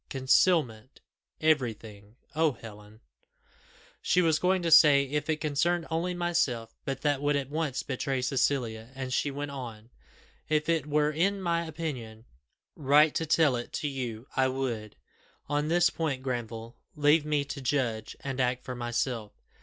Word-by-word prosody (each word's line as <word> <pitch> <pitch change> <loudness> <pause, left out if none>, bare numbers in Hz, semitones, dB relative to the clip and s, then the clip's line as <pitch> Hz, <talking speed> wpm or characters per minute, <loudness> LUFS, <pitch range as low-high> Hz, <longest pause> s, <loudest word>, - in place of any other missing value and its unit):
concealment 130 -3 +1 0.4
everything 115 -8 -1 0.2
Oh! 160 -2 +2
Helen 105 -1 -13 0.5
" - - -30 0.3
She 180 - +2
was 160 -2 +2
going 185 0 +1
to 165 - 0
say, 150 -3 +8
"If 145 +2 -3
it 155 -1 0
concerned 160 +3 0
only 175 +3 -1
myself," 145 -10 -1
but 135 -1 -3
that 145 -2 +1
would 145 0 +1
at 140 -1 -2
once 150 -4 -2
betray 130 -1 -2
Cecilia, 125 -4 0
and 130 -1 -4
she 145 - +1
went 145 +1 -5
on. 120 -4 -8 0.6
"If 155 -1 +1
it 160 -3 +1
were 150 0 +2
in 195 +6 +1
my 170 -2 -1
opinion 130 -9 -6 0.5
right 150 +1 +4
to 165 - -2
tell 155 -4 +3
it 120 0 -5
to 150 - -2
you, 125 -4 -5
I 130 0 +3
would. 125 -5 -3 0.5
On 145 +1 0
this 170 +1 +3
point, 140 -5 -2
Granville, 115 -2 -5 0.2
leave 150 +1 +4
me 150 -1 0
to 140 -1 -6
judge 120 -5 -1
and 135 -1 -3
act 125 0 0
for 125 - -5
myself. 120 -2 -3
140 Hz, 160 wpm, -28 LUFS, 120-155 Hz, 0.6 s, say